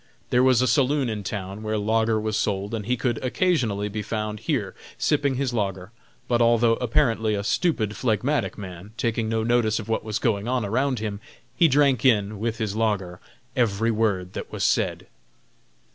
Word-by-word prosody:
There 125 - +4
was 130 -1 +4
a - - +2
saloon 135 +2 +2
in 105 -2 -3
town 100 0 -5
where 110 0 -2
lager 110 +1 +1
was 110 0 -2
sold 100 -1 -1
and 110 -2 -4
he 125 +1 +1
could, 120 -1 -1
occasionally, 125 - +1
be 105 +1 -4
found 105 0 -3
here - - -2 0.2
sipping 145 -3 +1
his 130 -1 -1
lager; 95 -3 -2 0.4
but 120 -1 +2
although 115 0 +4
apparently 115 -4 +1
a 100 - -2
stupid, 110 - 0
phlegmatic 130 +5 0
man, 95 0 -9
taking 115 -2 -1
no 110 0 0
notice 115 -2 +2
of 110 - -6
what 110 - 0
was 110 -2 -2
going 105 -2 0
on 125 -3 0
around 130 +5 0
him, 105 -2 -4 0.4
he 170 - +5
drank 140 -4 +3
in, 105 -5 +2
with 115 +1 -2
his 110 -3 -2
lager, 100 -5 -1 0.4
every 115 -2 +1
word 100 -5 0
that - - -6
was - - -3
said. - - +1
110 Hz, 180 wpm, -24 LUFS, 105-125 Hz, 0.4 s, he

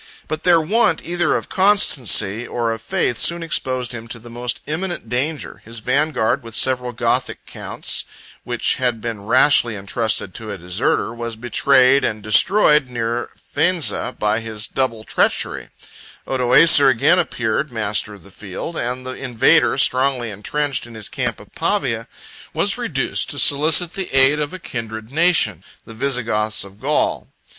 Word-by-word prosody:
But 155 0 -4
their 175 -2 +4
want 175 +1 +1
either 175 +1 0
of - - -7
constancy 130 - +3
or 115 -1 -2
of 115 0 -5
faith 115 +1 -1
soon 170 0 +2
exposed 130 -6 -2
him 115 -1 -8
to 115 - -7
the 115 +1 -13
most 120 0 -3
imminent 170 -4 -5
danger; 140 +6 -3
his 115 +1 -10
vanguard, 125 +1 0
with 115 -2 -10
several 125 -1 0
Gothic 120 - -1
counts, - - -3 0.4
which - - -1
had 125 -3 -1
been 110 -2 -6
rashly 125 -2 +4
intrusted 100 -1 -1
to 110 -2 -9
a 100 - -6
deserter, 90 +5 -1
was 115 -1 -6
betrayed 130 +3 +3
and 105 -1 -2
destroyed 150 - +4
near 120 0 -3
Faenza 175 -7 0
by 105 +1 0
his 110 -1 -3
double 115 -5 -2
treachery; - - -1 0.6
Odoacer 135 +3 +5
again 145 +8 +3
appeared 120 +2 -2
master 105 -2 -2
of 100 - -17
the 100 - -16
field, 105 - -7
and 125 -1 -4
the 130 - -5
invader, 125 -4 +2
strongly 130 -3 +1
intrenched 135 +6 -3
in 115 - -13
his 110 -2 -6
camp - - -3
of - - -16
Pavia, - - -1 0.5
was - - +2
reduced - - -2
to - - -5
solicit 160 +4 +4
the 190 -2 -5
aid 135 +2 +4
of 145 -1 -2
a 185 - -7
kindred 110 -7 -7
nation, 150 - +2 0.2
the 115 - -10
Visigoths 115 -4 0
of 100 +1 -14
Gaul. 145 +5 -1
125 Hz, 155 wpm, -19 LUFS, 110-145 Hz, 0.6 s, Odoacer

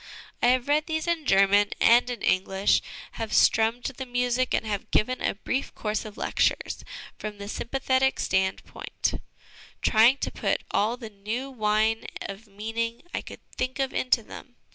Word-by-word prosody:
I - - +4
have 250 +1 +3
read 300 +1 +2
these 315 -1 -2
in 335 -3 -1
German 200 +1 +4
and 240 +2 +5
in 245 -3 -5
English, 190 +1 +2 0.4
have 220 -1 -3
strummed 225 +2 +3
the 265 0 -4
music, 245 +1 0
and - - 0
have 205 -2 -3
given 255 +4 +1
a - - 0
brief 255 +6 -3
course 215 0 -2
of 210 -1 -9
lectures - - 0 0.4
from 210 -1 -6
the 200 0 -7
sympathetic 265 +3 0
stand 190 0 0
point, - - -3 0.6
trying 235 +5 +5
to - - -3
put - - -1
all 220 +4 +1
the 225 -3 -9
new 220 +7 -4
wine 220 -1 +1 0.2
of 200 +3 -8
meaning 225 +3 -4
I - - -1
could - - -12
think 255 +1 -2
of 270 -1 -1
into 250 -2 +1
them. 245 +3 -11
230 Hz, 165 wpm, -26 LUFS, 210-255 Hz, 0.6 s, and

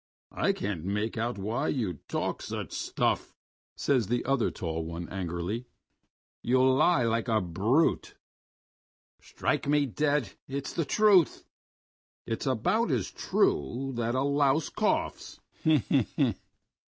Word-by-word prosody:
"I - - +2
can't 95 -5 -3
make 105 +4 -2
out 120 0 -2
why 110 +9 -2
you 105 - -1
talk - - -2
such - - -5
stuff," - - -1 0.4
says 125 -7 +1
the 120 +1 -1
other 135 -3 +2
tall 80 -1 -4
one 85 +1 -6
angrily. 95 +6 -3 0.7
"You 130 +2 +3
lie 135 +1 +4
like 115 +1 0
a 110 -2 +3
brute." 105 - +1 1.1
"Strike - - -2
me 145 0 +3
dead, 145 -4 0 0.2
it's 135 0 -4
the 165 - -1
truth!..." 200 -1 +4 0.8
"It's 115 +5 -3
about 135 - +1
as 125 -9 -1
true 125 - 0
as 125 - -7
that 120 +1 -1
a 130 - +1
louse 140 +1 +2
coughs." - - -1
120 Hz, 125 wpm, -29 LUFS, 100-140 Hz, 1.1 s, lie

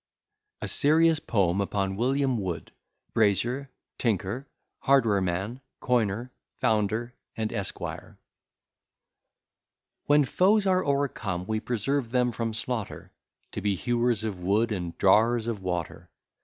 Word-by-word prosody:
A - - -2
SERIOUS 160 +1 +4
POEM 95 -3 +1
UPON 100 -1 -1
WILLIAM 130 +2 +1
WOOD, 85 -6 -4 0.4
BRAZIER, 115 +6 +1 0.3
TINKER, 115 +4 -1 0.3
HARD 135 -2 +4
WAREMAN, 100 +4 -1 0.2
COINER, 120 -1 0 0.3
FOUNDER, 110 +3 0 0.2
AND 110 -1 -1
ESQUIRE 100 -5 -5 1.9
When 145 0 +5
foes 200 - +3
are 185 -1 +3
o'ercome, 120 -11 -1
we 110 +1 -1
preserve 120 +3 -1
them 125 0 +2
from 115 0 -2
slaughter, 115 -2 -4 0.4
To - - -5
be 100 -1 +1
hewers 120 +1 0
of 105 -5 -3
wood, 105 +6 +1
and 90 -5 -4
drawers 110 +4 +4
of 115 -4 -3
water. 90 -3 -4
115 Hz, 115 wpm, -27 LUFS, 100-130 Hz, 1.9 s, When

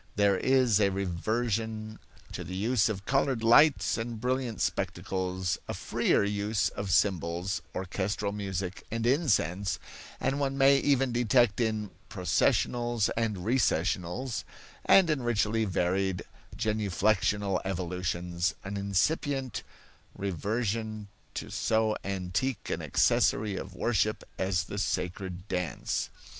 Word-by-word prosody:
There 100 -1 +4
is 130 -5 +3
a 100 - +4
reversion 110 +3 -2 0.3
to 90 - -5
the 90 +2 -6
use 110 +3 +2
of 100 -2 -4
colored 135 -3 +1
lights 135 +3 +5
and 115 0 -4
brilliant 125 -1 -1
spectacles, 95 -2 -1
a - - -3
freer - - +1
use 105 +1 0
of 100 -1 -5
symbols, 90 0 +1
orchestral 100 +2 -2
music 95 -2 -4
and 115 0 -2
incense, 100 - +1 0.4
and 140 - 0
one 135 -1 -1
may 135 0 +6
even 135 -2 +2
detect 120 -2 +3
in 110 -3 -1 0.2
"processionals" 115 +5 +1
and 105 -5 -1
"recessionals" 115 -1 0 0.4
and 190 -3 +6
in 150 -4 0
richly 110 -1 +1
varied 95 0 0 0.3
genuflexional 105 -2 +1
evolutions, 90 -1 -2
an 100 +1 -4
incipient 130 - 0 0.5
reversion 105 +3 -2 0.3
to - - -5
so 110 -1 +1
antique 95 +5 -2
an - - -2
accessory 105 -1 +2
of 95 0 -6
worship 110 +1 0 0.2
as 95 -1 +1
the 100 +4 -5
sacred 95 -1 -3
dance. 90 -3 -2
105 Hz, 115 wpm, -29 LUFS, 95-120 Hz, 0.5 s, may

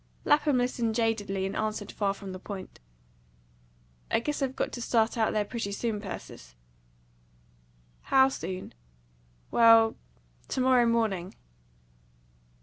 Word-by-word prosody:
Lapham 295 -2 +3
listened 240 -2 0
jadedly, 210 -4 0
and 195 - -4
answered 215 -1 -3
far 200 -2 -1
from 195 -1 -8
the 185 - -7
point. 190 -1 -8 1.3
"I - - +2
guess 295 +5 -3
I've 265 -1 -1
got - - -2
to 240 - -6
start 230 -1 +1
out 225 -2 +1
there 210 -1 0
pretty 215 -2 -4
soon, 210 0 -2
Persis." - - -9 1.5
"How 265 0 +5
soon?" 185 -8 -6 0.8
"Well, 225 -1 +6 0.5
to - - -3
morrow 255 -2 +4
morning." 215 -6 0
225 Hz, 125 wpm, -28 LUFS, 200-240 Hz, 1.5 s, Well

